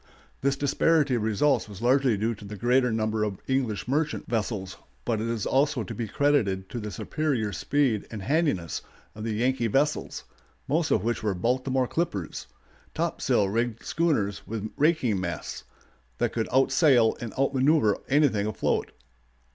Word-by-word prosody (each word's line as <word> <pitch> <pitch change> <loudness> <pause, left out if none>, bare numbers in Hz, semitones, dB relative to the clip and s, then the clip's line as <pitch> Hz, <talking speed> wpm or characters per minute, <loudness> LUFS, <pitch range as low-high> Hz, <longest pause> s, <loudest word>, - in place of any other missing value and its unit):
This 135 0 +2
disparity 145 +1 +2
of 120 - +1
results 110 +4 +1
was 100 -2 -9
largely 125 -1 +3
due 110 +3 0
to 105 - -12
the 105 +1 -7
greater 125 +3 +2
number 110 -1 0
of 105 -3 -2
English 130 -6 -1
merchant 150 +4 -1
vessels, 105 -4 -2 0.3
but 110 -3 0
is 115 -2 -2
also 140 -2 +2
to 95 - -6
be 115 -2 -4
credited 100 -9 +1
to 120 - -4
the 105 -1 -5
superior 120 -3 -2
speed 120 - 0
and 105 -4 -6
handiness 140 - 0 0.3
of 105 - -8
the 110 -1 -2
Yankee 120 +1 +1
vessels, 145 +7 0 0.4
most 155 +3 +1
of 100 - +2
which 120 +1 -1
were 105 -3 -1
"Baltimore 130 +6 0
clippers," 105 - -3 0.5
topsail 100 - +1
rigged 115 +3 -2
schooners 140 - 0
with 110 -1 -4
raking 140 - +2
masts, 85 -4 -5 0.5
that - - 0
could 115 -1 -1
outsail 135 -3 +4
and 115 -2 -5
out 135 +1 +1
manœuver 135 -5 +3
anything 135 -8 +3
afloat. 110 - -1
120 Hz, 155 wpm, -27 LUFS, 105-140 Hz, 0.5 s, outsail